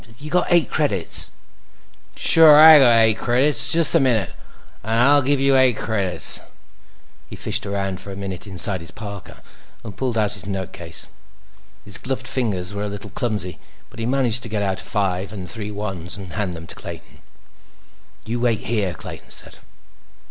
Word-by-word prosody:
You 150 +3 -9
got 180 - +1
eight 175 -2 +3
credits?" 105 - 0 0.9
"Sure 155 -2 +6
I 155 -1 +10
got 120 -4 +5
eight 110 -1 +2
credits. 125 +1 +2
Just 165 -2 +2
a - - +5
minute, 115 -8 +1 0.5
and 110 +1 -2
I'll 145 +4 +5
give 140 +1 +1
you 135 0 +3
eight 130 -4 +3
credits." 100 -5 0 0.9
He - - -9
fished 110 0 -3
around 100 -1 -3
for 100 - -9
a - - -7
minute 95 0 -7
inside 95 0 +4
his 85 - -10
parka, 100 -3 -10 0.4
and 105 -4 -9
pulled 125 -3 -2
out 105 -2 +1
his 100 -2 -4
notecase. 95 -2 -4 0.8
His 100 -1 -3
gloved 130 0 -3
fingers 100 -7 -2
were 100 - -5
a - - -4
little 100 0 -7
clumsy, 105 -7 -3 0.3
but 115 - -13
he 115 - -2
managed 125 -3 +1
to 115 - -5
get 105 -1 -2
out 95 -1 -2
a - - -13
five 95 -2 -1
and 95 -4 -7
three 105 +1 -6
ones 95 -4 -4
and 95 -4 -9
hand 95 -4 -3
them 80 0 -9
to - - -8
Clayton. - - -10 1.1
"You 120 +2 -3
wait 120 -2 0
out - - -12
here," 105 -6 -1
Clayton - - -9
said. - - -2
105 Hz, 180 wpm, -21 LUFS, 95-125 Hz, 1.1 s, I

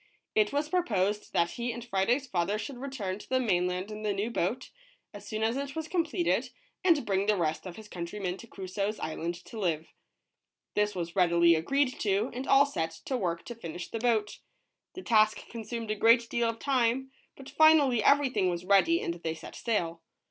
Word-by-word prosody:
It 215 -1 +3
was 290 +2 0
proposed 210 - 0
that 170 0 +2
he 240 0 -3
and 235 0 -7
Friday's 240 +6 +1
father 195 -3 -1
should 245 +4 -6
return 225 -8 -4
to - - -13
the 260 - +2
mainland 180 -3 0
in 215 0 -7
the 210 -1 0
new 205 +4 -2
boat, 235 +5 -2 0.4
as - - -10
soon 215 0 -3
as 225 +3 +1
it 280 +1 -4
was 320 -1 -3
completed, 340 0 0 0.3
and 330 -8 +4
bring 195 0 0
the 210 -1 +3
rest 160 0 -1
of 175 - -8
his 220 -1 -11
countrymen 180 0 -4
to 230 - -12
Cru 195 -3 -8
soe's 200 +3 -2
island 165 +2 -3
to 225 - -8
live. 165 -5 -2 0.8
This 210 -1 +1
was 170 -1 -4
readily 170 -2 +5
agreed 255 - +1
to, 205 +3 +1
and 255 +3 -5
all 275 +1 +6
set 165 - -2 0.2
to 265 - -1
work 170 -7 -2
to 240 - -6
finish 175 -6 -7
the 225 - -4
boat. 220 -3 0 0.6
The 370 - -7
task 215 -2 +3
consumed 230 -1 -5
a - - 0
great 230 +3 +5
deal 235 -1 +1
of 230 - -4
time, 260 0 +1 0.3
but 270 - -11
finally 295 -7 +5
everything 270 -9 +3
was 175 0 -3
ready 200 - +4
and 170 - -1
they 165 -1 -4
set - - -10
sail. 170 -8 -1
215 Hz, 200 wpm, -29 LUFS, 185-255 Hz, 0.8 s, all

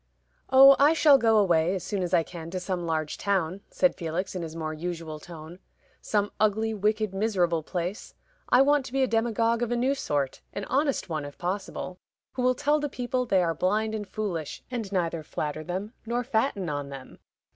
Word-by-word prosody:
"Oh, 270 +1 +9
I 290 +3 +6
shall 295 -4 +6
go 225 -2 +4
away 175 -3 +3
as 185 - -4
soon 200 -3 -2
as 175 -1 -2
I 170 -3 +4
can 165 -1 -8
to 185 +1 -3
some 180 -2 -3
large 155 -2 -2
town," 190 -2 0
said 275 - +2
Felix, 170 +2 -3
in 185 - -4
his 165 -1 -6
more 155 -1 -3
usual 160 -1 -5
tone 165 +2 -11 0.4
"some 205 -1 0
ugly, 220 +1 +2
wicked, 215 0 0
miserable 185 -5 +1
place. 175 +5 -5 0.3
I 250 +2 +6
want 290 0 +3
to - - -11
be 270 0 +2
a - - +2
demagogue 230 0 +1
of 240 -1 -1
a - - +2
new 255 +3 +2
sort; 145 - -2
an 200 - -4
honest 280 +3 0
one, 155 -4 -3
if 145 0 -9
possible, 185 0 -4 0.3
who 255 - -3
will 255 0 +3
tell 295 +3 +2
the 295 0 -2
people 250 0 -2
they 190 -3 +3
are 165 -1 +1
blind 215 +5 0
and 210 -2 -4
foolish, 185 -7 -4
and 225 -5 -4
neither 170 -4 -1
flatter 155 0 -4
them 190 +6 -4
nor 240 +1 0
fatten 225 -6 0
on 145 -2 -3
them. 135 -2 -10
195 Hz, 200 wpm, -27 LUFS, 170-235 Hz, 0.4 s, Oh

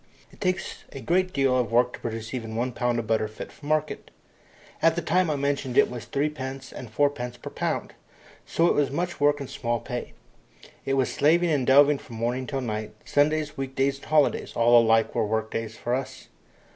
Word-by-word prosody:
It - - -20
takes 185 -2 -2
a 135 - -7
great 180 +6 +1
deal 135 -5 +2
of 125 -3 0
work 125 +1 +3
to - - -8
produce 115 0 -5
even 115 -3 -5
one 125 +3 -1
pound 120 0 0
of 115 - -2
butter 110 0 +1
fit 110 - -9
for 145 - -13
market. 155 0 -1 0.7
At 165 0 +4
the 170 - -1
time 180 0 +2
I 150 - +1
mention 140 -2 -1
it - - +5
was 120 -2 -7
3d. 150 +1 -1 0.4
and 120 -4 -8
4d. 125 -2 -1
per - - -6
lb., - - -2 0.5
so 165 - +1
it - - +4
was 145 -2 +2
much 175 +5 -3
work 145 0 +3
and 140 - -5
small 120 -2 -2
pay. 120 +2 -6 0.7
It 135 - +1
was 130 -2 +1
slaving 165 +3 +3
and 140 -5 +1
delving 140 +1 +6
from 115 - -11
morning 120 +3 -2
till 135 -2 -2
night 110 -3 -4
Sundays, 150 +1 +1
week 135 -1 -4
days, 135 +1 +1
and - - -14
holidays, 155 -2 +2
all 120 0 +6
alike 115 -1 +3
were 115 - +1
work 110 +1 -1
days 115 0 -4
to 120 - -2
us. 130 +1 -3
135 Hz, 210 wpm, -26 LUFS, 120-145 Hz, 0.7 s, delving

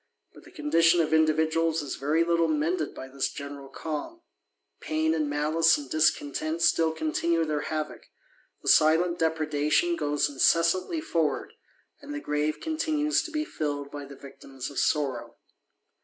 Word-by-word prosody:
But - - -16
the - - -14
condition 175 - +3
of 160 -1 +1
individuals 160 0 +2
^ - - -16
very 150 +4 +2
little 170 0 +2
mended 155 +1 -1
by 130 - -8
this 135 0 -2
general 140 -1 -8
calm: 160 - -6 0.6
pain 155 +1 0
and 155 -2 0
"^ce 155 +3 +3
and 140 -3 -9
discontent 155 +1 0
still 165 -1 +3
continue 170 - 0
their 150 -1 -1
havock; 155 -1 -4 0.6
the - - -10
*fcnt 170 +3 +4
depredation 160 - +1
goes 145 - 0
incessantly 170 - +2
forward: 165 - -1 0.5
and 290 +1 -7
the - - -3
grave 150 - -1
^ntinues 310 -1 0
to - - -6
be 305 -1 -2
filled 145 - -4
by 145 -1 -7
the 140 0 -11
victims 135 -1 -9
of 140 - -3
sorrow. 130 -6 -1
155 Hz, 150 wpm, -27 LUFS, 145-170 Hz, 0.6 s, fcnt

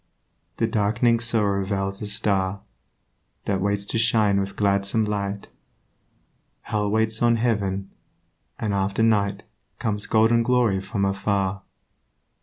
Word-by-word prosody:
The 115 - +1
dark'ning 115 +2 +1
sorrow 105 -5 +1
veils 95 0 -3
a 105 - -4
Star 100 -2 0 0.8
That 95 -2 -1
waits 100 0 -1
to 115 - -2
shine 110 -3 +3
with 100 0 -4
gladsome 100 +2 +1
light; 100 -1 -4 1.1
Hell 105 -2 -2
waits 110 +1 +2
on 120 -1 +4
heaven; 100 -5 -1 0.7
and 105 -2 -2
after 100 +2 0
night 100 -3 +1 0.3
Comes 105 -4 -2
golden 115 +1 +3
glory 115 -5 +2
from 100 +1 -2
afar. 100 0 -1
100 Hz, 120 wpm, -23 LUFS, 100-110 Hz, 1.1 s, on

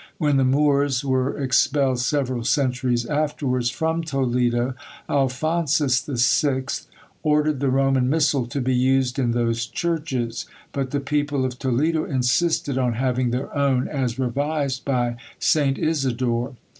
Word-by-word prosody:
When 145 -4 +2
the 135 - +3
Moors 140 0 +2
were 130 0 0
expelled 135 -1 +2
several 130 -2 -1
centuries 125 -2 0
afterwards 140 -4 -1
from 160 +6 -1
Toledo, 125 -4 0 0.3
Alphonsus 140 0 +1
the 140 -4 -5
Sixth 130 +2 +1 0.3
ordered 150 -2 +1
the 140 -1 +1
Roman 135 -1 +2
missal 145 -4 +2
to 130 +4 -3
be 130 +1 0
used 130 +1 +2
in 125 -3 +1
those 115 -1 0
churches; 150 -9 -2 0.2
but 135 -2 -2
the 145 +1 -2
people 145 -1 0
of 125 0 -4
Toledo 150 +5 +1
insisted 135 +1 0
on 125 -2 +1
having 125 +1 0
their 125 +5 -3
own, 135 -3 +1
as 130 -5 -2
revised 140 +1 -1
by 120 -3 0 0.2
St. 145 -2 +2
Isidore. 130 -4 -1
135 Hz, 135 wpm, -23 LUFS, 125-145 Hz, 0.3 s, the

